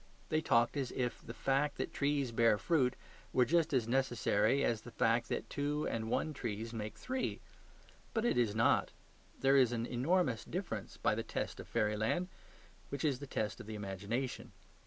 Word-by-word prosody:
They 155 -1 +2
talked 120 -5 +3
as 135 -3 -1
if 125 -1 -2
the - - -8
fact 140 +2 +1
that - - -3
trees 140 -3 +1
bear 115 -2 +4
fruit 135 -2 +2 0.4
were 125 - +5
just 165 +4 +2
as 125 -5 +2
NECESSARY 120 -1 +2
as 115 -2 0
the 120 - -10
fact 115 0 +1
that - - -2
two 145 +1 -1
and 110 -1 -2
one 155 +6 0
trees 115 -3 -4
make 110 -1 -4
three. 260 0 -2 0.7
But 225 0 0
it - - +3
is 115 -4 +2
not. 115 +1 +3 0.5
There 135 +1 +5
is 125 -3 +5
an 115 -1 -1
enormous 130 0 +1
difference 170 - -5
by - - +2
the - - -1
test - - -4
of - - -8
fairyland; 110 - 0 0.6
which 140 +1 -3
is 135 -4 +1
the 140 - -7
test 105 -6 -2
of - - -9
the 110 - -5
imagination. 105 +6 -4
125 Hz, 180 wpm, -35 LUFS, 115-145 Hz, 0.7 s, were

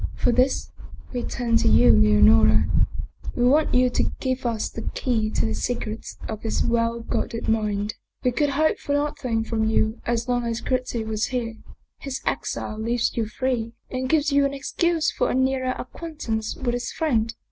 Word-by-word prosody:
For - - +2
this 255 +3 +1 0.4
we 245 - -1
turn 235 -1 0
to - - +1
you, 120 0 +6
Leonora; 105 0 +5 0.7
we 245 - +1
want 290 +5 +4
you 250 0 +5
to - - 0
give 260 -1 -1
us 225 -2 -1
the - - -7
key 225 -5 0
to - - 0
the 225 - -1
secrets 230 -2 -4
of 220 -2 -5
this 225 - 0
well 235 0 0
guarded 230 0 -3
mind. 210 -1 0 0.3
We 250 - +3
could 290 +4 +1
hope 310 +3 +1
for 285 - -2
nothing 285 -6 0
from 225 -1 -1
you 220 +1 +1
as 235 0 0
long 245 -1 +1
as 230 0 -2
Gritti 255 -3 -1
was 220 0 -1
here. 240 -3 -3 0.5
His 270 -1 -4
exile 215 - -3
leaves 235 +1 0
you 225 -2 0
free 235 -1 -2 0.2
and 255 0 -2
gives 300 -1 +2
you 280 0 +4
an 280 0 0
excuse 320 +3 0
for - - 0
a - - 0
nearer 260 0 +1
acquaintance 250 -7 -4
with 245 -3 -2
his 245 0 -3
friend. 230 -8 0
240 Hz, 180 wpm, -24 LUFS, 220-260 Hz, 0.7 s, you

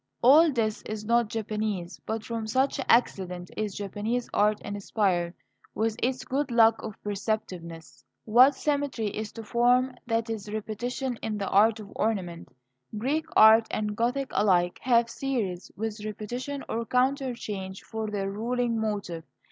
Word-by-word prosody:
All 305 +6 +7
this 220 -4 -1
is 215 0 -5
not 235 +1 +3
Japanese, 210 -5 -3
but 220 0 -2
from 230 -2 -4
such 265 +5 +1
accident 180 -6 +1
is 210 -2 -3
Japanese 210 +4 -3
art 210 +1 +3
inspired, 195 -4 -1 0.4
with 220 0 0
its 255 +1 -1
good 280 +2 -1
luck 225 -1 +4
of 215 -2 -7
perceptiveness. 195 -6 -4 0.2
What 250 +5 +6
symmetry 285 -7 -1
is 215 0 -5
to 225 - -7
form, 245 +3 +2
that 230 -1 0
is 215 -2 -5
repetition 240 +4 -3
in 215 -1 -2
the 200 -1 -3
art 215 +3 +4
of 205 -2 -10
ornament. 180 -6 -2 0.5
Greek 285 +8 -1
art 220 +1 +8
and 210 -1 -2
Gothic 250 +4 -1
alike 180 -4 +2
have 235 -2 +3
series, 230 -9 -3
with 215 0 -4
repetition 245 +7 -5
or 230 +1 -2
counter 255 +2 +1
change 190 -4 -6
for 220 -1 -4
their 195 -2 -2
ruling 235 +2 -1
motive. 200 -6 -3
220 Hz, 150 wpm, -27 LUFS, 205-245 Hz, 0.5 s, art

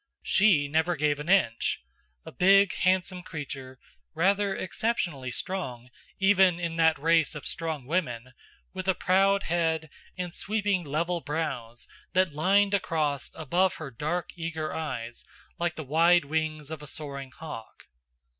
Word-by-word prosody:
She 190 -9 +4
never 160 +4 +1
gave 145 0 +1
an 150 +3 -6
inch. 150 -13 +2 0.4
A - - -8
big, 195 +5 +5
handsome 185 0 +1
creature, 135 -5 -7 0.4
rather 200 +1 +2
exceptionally 175 - -2
strong 125 -5 -5 0.3
even 190 -3 +4
in 170 -1 -3
that 160 -1 +4
race 160 0 +2
of 150 - -7
strong 160 -5 -3
women, 130 -6 -2 0.4
with 190 0 -5
a 190 - +3
proud 195 +2 +3
head 160 -2 0 0.3
and 180 -1 -4
sweeping 205 -3 -1
level 165 +4 -1
brows 135 -7 -4 0.3
that 185 -3 +2
lined 195 +6 +3
across 155 -7 0
above 175 +4 +1
her 155 -4 -7
dark 155 +9 -3
eager 165 -2 -4
eyes 120 -7 -5 0.4
like 175 0 0
the 155 - -5
wide 165 +3 +4
wings 155 0 -2
of 160 -2 -6
a 150 - -9
soaring 140 -2 -6
hawk. 130 -6 -9
160 Hz, 140 wpm, -28 LUFS, 145-185 Hz, 0.4 s, big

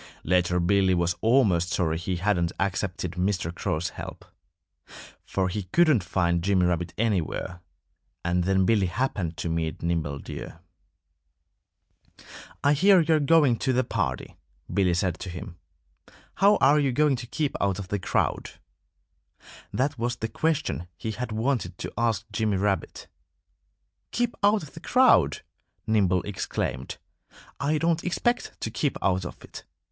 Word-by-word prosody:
Later 90 +1 +2
Billy 95 +1 +3
was 85 0 +1
almost 105 -8 +3
sorry 80 -3 0
he 90 +2 -2
hadn't 90 -2 +1
accepted 95 -2 -2
Mr. 90 -2 -1
Crow's 85 -1 -2
help. - - -9 1.0
For 95 -1 -1
he 95 +1 -3
couldn't 155 - +4
find 85 -1 0
Jimmy 95 -1 +3
Rabbit 90 -1 -1
anywhere. 95 -4 -1 0.6
And 90 +1 +1
then 95 0 +2
Billy 100 -2 +3
happened 90 -5 -2
to 80 - -3
meet 80 -1 -2
Nimble 80 -4 -1
Deer. 80 +3 -8 2.0
"I 145 - +5
hear 190 +6 +5
you're 160 -1 +3
going 145 -4 +4
to 130 - +1
the 130 +1 +2
party," 90 - -3 0.4
Billy 95 -3 +2
said 90 -1 -1
to 95 - -6
him. 90 0 -8 0.8
"How 200 +2 +5
are 145 -1 +4
you 140 -2 +1
going 150 +2 +3
to 120 - -7
keep 145 +3 -2
out 100 -2 +1
of 95 -2 -7
the 100 - -1
crowd?" - - -1 1.2
That 135 0 -1
was 120 +1 -1
the 110 - -4
question 155 - -1
he 110 - -4
had 120 +2 -5
wanted 120 +3 -1
to - - -6
ask 115 -2 0
Jimmy 105 -1 0
Rabbit. 100 0 -2 1.0
"Keep 240 0 -1
out 205 -1 +3
of 150 - -11
the 165 - -9
crowd!" 175 - +4 0.4
Nimble 95 -5 +2
exclaimed. 65 -9 -4 0.6
"I 150 +3 +1
don't 165 +1 +1
expect 240 +7 -1
to 110 - -3
keep 130 +5 -1
out 95 -2 +1
of - - -9
it. - - -10
100 Hz, 145 wpm, -26 LUFS, 90-135 Hz, 2.0 s, I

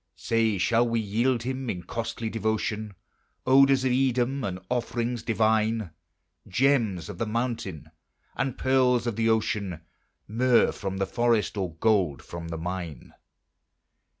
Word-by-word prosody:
Say, 115 -3 +1
shall 115 +6 +2
we 115 0 +1
yield 115 +3 0
him, 130 0 -3
in 90 -4 -3
costly 115 0 -4
devotion, 110 -1 -2 0.5
Odors 135 0 +5
of 130 - +2
Edom, 130 +1 +1
and 95 -4 -3
offerings 120 -1 -2
divine? 110 -3 +1 0.6
Gems 110 -5 +1
of - - -8
the 115 - -1
mountain, 105 - -3 0.4
and 130 0 -2
pearls 125 -2 +3
of 120 -3 -1
the 115 +1 +1
ocean, 105 -6 0 0.5
Myrrh 120 +2 +3
from 95 -2 -5
the 95 - 0
forest, 115 -3 +1
or 95 -5 -3
gold 95 - +1
from 85 -1 -7
the 80 0 -5
mine? 85 -3 -6
115 Hz, 135 wpm, -26 LUFS, 100-125 Hz, 0.6 s, Odors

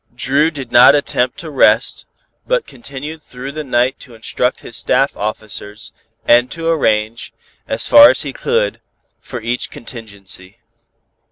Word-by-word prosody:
Dru 140 +5 +2
did 135 -6 -8
not 125 +4 +7
attempt 130 -3 -1
to 160 -2 -8
rest, 115 -4 +3 0.4
but - - 0
continued 150 - -9
through 130 -1 -8
the 155 +1 -5
night 125 0 0
to 120 -4 -11
instruct 125 +2 -2
his 115 - -9
staff 135 +4 +1
officers, 105 0 -6 0.3
and 120 +1 +4
to 165 +2 -3
arrange, 115 -7 0 0.4
as - - -1
far 290 0 +9
as - - +1
he - - -5
could, 470 +2 -1 0.4
for 125 - -7
each 120 +2 -2
contingency. 100 -5 -10
125 Hz, 145 wpm, -16 LUFS, 115-150 Hz, 0.4 s, far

